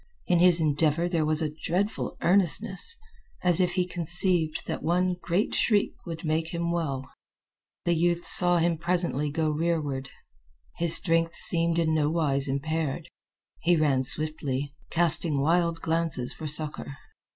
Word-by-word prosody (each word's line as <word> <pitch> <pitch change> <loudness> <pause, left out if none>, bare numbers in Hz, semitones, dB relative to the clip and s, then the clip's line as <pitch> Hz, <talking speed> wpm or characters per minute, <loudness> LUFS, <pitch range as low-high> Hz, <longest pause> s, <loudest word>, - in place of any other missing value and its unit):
In 175 -1 +1
his 175 -1 +5
endeavor 155 +2 0
there 165 -3 -1
was 155 +1 0
a 150 -1 -4
dreadful 195 +5 -3
earnestness, 190 - +2 0.5
as 180 -1 +4
if 180 -1 0
he 180 -1 0
conceived 175 -2 +2
that - - -5
one 180 +2 0
great 180 +5 -2
shriek 210 -3 +1
would 165 0 -7
make 160 +1 -1
him 170 0 -4
well. 140 -6 -3 0.8
The 175 - +1
youth 170 +1 -1
saw 175 -1 +8
him 165 -1 0
presently 170 -4 -1
go 155 +1 -2
rearward. 150 -4 -3 0.7
His 170 -1 +4
strength 165 -1 +1
seemed 170 -1 -1
in 160 -2 0
nowise 150 -3 +1
impaired. 145 +1 -4 0.5
He 175 +1 +2
ran 145 -5 +1
swiftly, 145 -1 -3 0.2
casting 165 -3 +2
wild 170 +3 0
glances 160 -6 -1
for 155 - -8
succor. 150 -1 -2
165 Hz, 140 wpm, -26 LUFS, 150-175 Hz, 0.8 s, saw